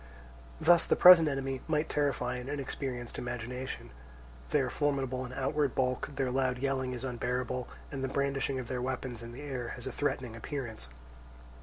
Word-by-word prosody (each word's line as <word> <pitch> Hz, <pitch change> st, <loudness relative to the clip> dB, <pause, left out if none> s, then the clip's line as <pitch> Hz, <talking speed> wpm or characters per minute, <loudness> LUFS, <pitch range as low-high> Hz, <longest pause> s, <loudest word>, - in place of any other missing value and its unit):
Thus 170 Hz, -1 st, +6 dB
the -, -, +2 dB
present 175 Hz, -4 st, +9 dB
enemy 135 Hz, -1 st, -2 dB
might 155 Hz, -1 st, +1 dB
terrify 140 Hz, -3 st, 0 dB
an 125 Hz, +2 st, -6 dB
inexperienced 135 Hz, -3 st, -4 dB
imagination; 125 Hz, +2 st, -5 dB, 0.6 s
they 150 Hz, -, +3 dB
are 130 Hz, -, 0 dB
formidable 135 Hz, -3 st, 0 dB
in -, -, -10 dB
outward 135 Hz, 0 st, 0 dB
bulk, 130 Hz, +1 st, 0 dB
their 135 Hz, -2 st, 0 dB
loud 130 Hz, -1 st, +1 dB
yelling 130 Hz, -1 st, -1 dB
is 125 Hz, -, -5 dB
unbearable, 125 Hz, 0 st, -2 dB, 0.2 s
and 135 Hz, -2 st, -4 dB
the -, -, +1 dB
brandishing 135 Hz, 0 st, 0 dB
of 125 Hz, -2 st, -4 dB
their 125 Hz, 0 st, -2 dB
weapons 125 Hz, -2 st, -3 dB
in 115 Hz, 0 st, -8 dB
the 130 Hz, +5 st, -8 dB
air 130 Hz, -4 st, -4 dB
has 125 Hz, -, -9 dB
a 130 Hz, -, -3 dB
threatening 130 Hz, -3 st, -2 dB
appearance. 115 Hz, -, -5 dB
130 Hz, 170 wpm, -31 LUFS, 125-140 Hz, 0.6 s, present